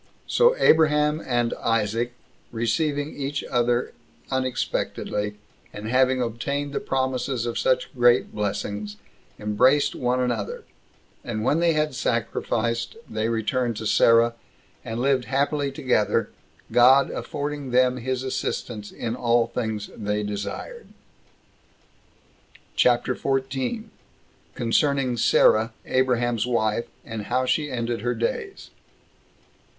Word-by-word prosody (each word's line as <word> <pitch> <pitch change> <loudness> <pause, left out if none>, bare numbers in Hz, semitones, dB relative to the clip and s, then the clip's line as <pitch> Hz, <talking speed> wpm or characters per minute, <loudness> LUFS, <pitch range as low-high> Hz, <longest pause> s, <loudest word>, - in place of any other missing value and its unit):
So 485 +1 +4
Abraham 150 - +4
and 120 -2 +1
Isaac 115 +1 0 0.4
receiving 145 +6 -1
each 140 +1 -3
other 120 0 0 0.4
unexpectedly, 125 -5 -2 0.4
and 105 +1 -7
having 130 0 +3
obtained 140 +5 -3
the - - 0
promises 130 -2 -1
of 120 - -2
such 130 -1 +1
great 120 -1 +3
blessings, 105 0 -3 0.4
embraced 125 +7 +3
one 125 0 0
another; 120 -5 -2 0.6
and 110 -2 -3
when 145 +7 +2
they 170 -1 +3
had 155 -1 0
sacrificed, 115 - -1
they 110 +1 -2
returned 115 +1 -1
to 110 - -5
Sarah, 115 +2 +4 0.5
and 115 +1 -4
lived 130 -1 +2
happily 140 +1 0
together, 130 -7 +1 0.4
God 130 +3 +6
affording 145 -1 -4
them 125 0 +3
his 130 +1 -2
assistance 110 -4 -4
in 115 0 -4
all 120 -1 +2
things 110 -3 -4
they 105 0 -2
desired. 105 - -5 1.9
CHAPTER 125 +1 +3
14. 135 - -2 0.6
Concerning 130 +2 +1
Sarah 110 0 +4
Abraham's 120 -3 +1
Wife; 115 -1 0 0.2
And 110 -2 -6
How 130 +3 0
She 150 +3 0
Ended 120 -2 -2
Her 120 0 -1
Days. 120 - -4
125 Hz, 110 wpm, -24 LUFS, 115-135 Hz, 1.9 s, God